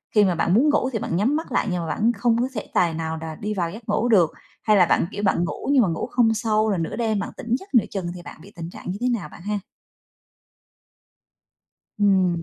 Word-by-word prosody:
khi 210 - +6
mà 180 -3 +2
bạn 170 - +1
muốn 275 +8 +4
ngủ 265 -3 +2
thì 225 - -3
bạn 170 - -3
nhắm 225 - +2
mắt 320 - -4
lại - - +1
nhưng 180 - -1
mà 165 - -4
bạn 225 +7 +1
không 235 -2 +2
có 250 - +1
thể 215 - -4
tài 170 -2 +2
nào 160 0 -3
đá 160 -1 -6
đi 210 +4 -4
vào 170 -4 -2
giấc 220 +2 -11
ngủ 240 - +1
được, 180 -8 +4 0.3
hay 215 -1 +4
là 180 - +6
bạn, - - +2
kiểu, 205 - -5
bạn 190 -3 +2
ngủ 220 - -5
nhưng 275 - +5
mà 205 - +3
ngủ 165 - -2
không 230 -2 +3
sâu 220 -1 +1
rồi 195 - +1
nửa 165 - -3
đêm 220 -3 0
bạn - - -3
tỉnh 235 +1 -1
giấc 390 -3 -15
nửa 235 - +5
chừng 180 -4 -3
thì 175 - -8
bạn 170 - -11
bị - - -14
tình 170 0 -6
trạng 180 - -7
như 195 - -4
thế 250 - +1
nào 230 -6 -2
bạn - - -13
ha? 205 +2 -2 2.4
Ừm. 190 -4 +3
205 Hz, 260 wpm, -23 LUFS, 175-225 Hz, 2.4 s, khi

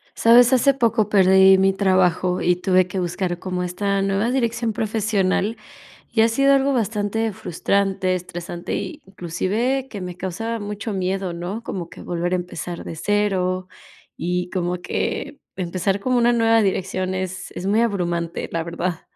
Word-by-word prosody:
¿Sabes? 240 +2 +6
hace 275 +2 +4
poco 230 -4 +1
perdí 190 -1 +6
mi 195 0 +3
trabajo 185 -2 +2
y 180 0 +3
tuve 185 0 +2
que 185 +1 -4
buscar 175 0 -2
como 180 -1 -3
esta 195 +2 -1
nueva 195 +3 +1
dirección 235 -3 0
profesional, 215 -1 0 0.6
y 225 - +4
ha 225 - +6
sido 275 +4 +3
algo 275 0 +3
bastante 220 -1 -1
frustrante, 190 0 0
estresante, 175 -1 -5
y 200 -2 -5
inclusive 205 +9 -2
que 205 - -7
me 180 -1 -6
causa 225 +6 -3
mucho 205 +1 -5
miedo, 190 0 -2
¿no? 180 +7 -5
como 175 -6 -5
que - - -12
volver 175 +1 -2
a - - +4
empezar 175 -1 -5
de - - -7
cero, 185 -1 0 0.5
y 180 +1 -2
como 180 -1 -2
que 285 +9 -3 0.2
empezar 185 +2 -1
como 255 +3 +1
una 240 0 +4
nueva 225 -1 +4
dirección 185 -1 -1
es 185 0 -5
es 180 - -6
muy 210 +3 +3
abrumante, 175 -6 -1
la 165 -1 -1
verdad. 170 0 -3
190 Hz, 160 wpm, -22 LUFS, 180-220 Hz, 0.6 s, Sabes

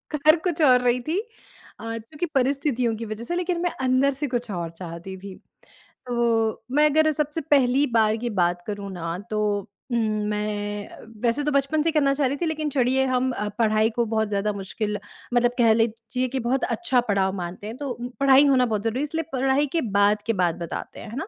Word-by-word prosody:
कर 310 +2 +5
कुछ 340 -2 -1
और 255 -4 +6
रही 245 0 +2
थी 325 +9 -1
अ, 450 - -14
क्योंकि 290 +9 -5
परिस्थितियों 255 -3 +1
की 230 +1 -6
वजह 215 +2 -6
से 345 - -2
लेकिन 355 -1 -1
मैं 350 - +1
अंदर 260 +2 +3
से 285 +2 -3
कुछ 245 -2 -3
और 170 -3 -3
चाहती 175 +1 -7
थी। 195 0 -9 0.7
तो 245 - -2
वो 225 -2 +1
मैं 300 +1 +5
अगर 310 +1 +3
सबसे 300 +2 -2
पहली 270 0 +4
बार 220 -1 +3
की 240 +1 -3
बात 175 0 +1
करूँ 200 -1 -5
ना 170 -1 -4
तो 215 - -1 0.5
उम, - - +2 0.3
मैं 205 -1 -3 0.3
वैसे 240 +5 +2
तो 300 - 0
बचपन 280 +3 +1
से 330 - +1
ही - - +1
करना 280 -3 +3
चाह 275 -1 +1
रही 280 +2 -2
थी। - - +2
लेकिन 310 -1 -1
चढ़िये 265 0 +2
हम 255 0 +1 0.3
पढ़ाई 220 0 +3
को 235 - +2
बहुत 220 -1 0
ज़्यादा 210 +1 0
मुश्किल 205 +2 -3 0.3
मतलब 240 0 +3
कह 230 -3 +5
लीजिए 230 +3 -1
कि 265 +1 -3
बहुत 255 +2 0
अच्छा 265 -8 +1
पड़ाव 190 -1 +2
मानते 175 +3 -6
हैं 225 +3 -7
तो 280 -3 -3 0.3
पढ़ाई 275 +1 +6
होना 260 -2 +4
बहुत 215 -3 -2
ज़रूरी 225 +2 -1
है। - - 0
इसलिए 320 +2 -2
पढ़ाई 270 +2 +2
के 330 - +2
बाद 205 -1 +2
के 230 - +2
बात 175 -4 +1
बताते 170 -2 -6
हैं, 225 - -9
है 230 - -8
ना। 320 - -4
245 Hz, 210 wpm, -24 LUFS, 210-280 Hz, 0.7 s, और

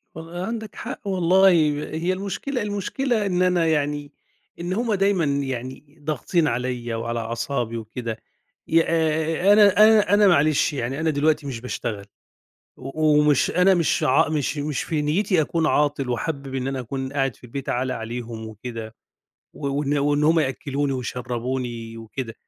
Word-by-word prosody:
وال 165 +1 -9
عندك 220 -2 -5
حق - - -6
والله 190 +1 +4 0.2
ب - - -2 0.2
هي 170 +4 0
المشكلة 200 +7 -3
المشكلة 210 +3 -1
إن 180 -2 0
أنا 180 -2 +3
يعني 145 -1 -1 0.5
إن 175 +2 -3
هم 230 +1 0
دايمًا 195 -3 +2
يعني 135 0 -4
ضاغطين 155 +2 0
عليّا 120 -2 -2
وعلى 115 +1 -3
أعصابي 115 +1 -3
وكده 115 0 -5 0.5
يا 165 0 +4
آآ 160 +3 +2
أنا 205 -2 +6
أنا 215 -2 +4
أنا 205 0 +6
معلش 155 -3 +3
يعني 135 +2 -3
أنا 160 0 +1
دلوقتي 150 0 +1
مش 120 -4 -5
باشتغل 105 -5 -4 0.7
و 150 +3 +1
ومش 150 -3 +3
أنا 180 +2 +4
مش 170 -3 +1
ع 130 +4 +3
مش 150 -1 -1
مش 145 -1 -2
في 155 -2 -1
نيّتي 170 +3 +1
أكون 160 +1 0
عاطل 145 -3 +1
وحابب 135 +1 -3
إن 130 0 -2
أنا 135 -1 -2
أكون 130 +2 -5
قاعد 135 -3 0
في - - -26
البيت 130 +3 -6
عالة 130 +1 -1
عليهم 115 -1 -6
وكده، 110 0 -8 0.6
و 140 - -5
وإن 145 +1 0
وإن 145 +1 +1
هم 160 +1 +4
يأكّلوني 140 0 -1
ويشرّبوني 120 -2 -4
وكده، 115 +1 -6
145 Hz, 155 wpm, -23 LUFS, 125-170 Hz, 0.7 s, أنا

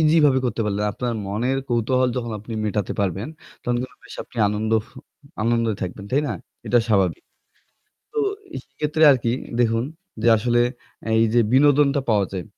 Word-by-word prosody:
ইজিভাবে 150 -4 +4
করতে 115 -1 -2
পারলেন। 105 0 -1
আপনার 120 +1 -3
মনের 120 +7 -1
কৌতূহল 125 +2 +2
যখন 120 -2 -3
আপনি 110 +3 -9
মেটাতে 105 -2 -1
পারবেন, 100 - -1 0.3
তখন 120 0 0
কিন্তু 130 - -7
বেশ - - -11
আপনি - - -21
আনন্দ 110 +1 -2 0.7
আনন্দে 115 -1 +1
থাকবেন, 95 +2 -5
তাই 140 +3 +3
না? - - -1 0.3
এটা 120 - +4
স্বাভাবিক। 95 -5 +2 0.9
তো 445 - -3 0.4
এই - - -3
সেক্ষেত্রে 150 +3 -2
আরকি 120 -3 +2 0.3
দেখুন 115 0 +2 0.4
যে 115 - +4
আসলে 120 +2 +2 0.6
এই 115 - +5
যে 120 - +6
বিনোদনটা 140 +1 +4
পাওয়া 105 -2 +3
যায়। 90 -2 -4
120 Hz, 155 wpm, -22 LUFS, 105-130 Hz, 0.9 s, যে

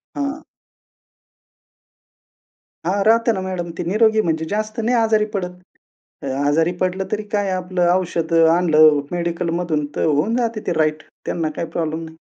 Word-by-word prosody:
हां. 285 +2 -3 2.4
हां. 195 +3 +1
राहते 230 +1 +4
ना 190 - -3
मॅडम 185 -2 -4
ते - - -2
निरोगी 215 +5 +3
म्हणजे 160 -4 -1
जास्त 215 +2 -3
नाही 230 +2 +1
आजारी 220 -2 +3
पडत. 180 -2 -3 0.7
अ, - - -4 0.2
आजारी 160 +4 +2
पडलं 185 +1 0
तरी 215 0 -1
काय 205 -2 +1
आपलं 180 -1 0
औषधं 165 -2 +2
आणलं 155 -4 +5
मेडिकलमधून 170 -2 -1
तर - - 0
होऊन 155 +9 +1
जाते 230 -3 -1
ते 175 - +1
राइट. 155 0 +1 0.2
त्यांना 160 -2 -1
काही 170 - -3
प्रॉब्लेम 160 0 -3
नाही. 160 0 -11
180 Hz, 145 wpm, -20 LUFS, 165-215 Hz, 2.4 s, आणलं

